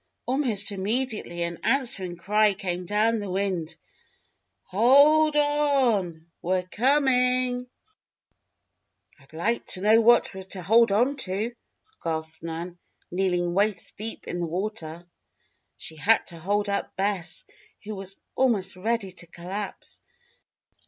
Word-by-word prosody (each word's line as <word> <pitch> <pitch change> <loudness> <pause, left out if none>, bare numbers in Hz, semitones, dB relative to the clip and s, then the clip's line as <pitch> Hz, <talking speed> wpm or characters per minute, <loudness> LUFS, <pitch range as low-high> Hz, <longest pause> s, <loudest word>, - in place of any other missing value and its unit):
Almost 240 -6 +2
immediately 205 -3 -2
an 170 -1 -4
answering 215 -10 0
cry 210 +3 +2
came 180 -2 -4
down 220 +3 +2
the 205 -2 -5
wind: 185 -4 -2 0.9
"Hold 285 +10 +5
o 295 - +5 0.5
on! 170 -5 -4 0.2
We're 185 +1 0
coming!" 250 +2 +1 1.5
"I'd 135 - -21
like 205 +9 -1
to 185 - -1
know 220 +3 +5
what 235 -1 +4
we're 190 - -7
to 190 -1 -5
hold 225 +4 +5
onto," 225 -2 0 0.5
gasped 160 -1 -3
Nan, 170 +2 -6 0.3
kneeling 180 -1 0
waist 200 +2 0
deep 225 +2 -6
in 175 - -3
the 170 - -2
water. 175 -2 -4 0.7
She 160 - -8
had 220 +9 +3
to 170 -2 -5
hold 205 +4 0
up 200 0 -3
Bess, 190 -4 -2 0.4
who 215 +1 -6
was 195 -1 -5 0.2
almost 210 -8 +1
ready 210 +1 -2
to 175 -1 -11
collapse. 185 +4 -7
200 Hz, 125 wpm, -26 LUFS, 175-230 Hz, 1.5 s, Hold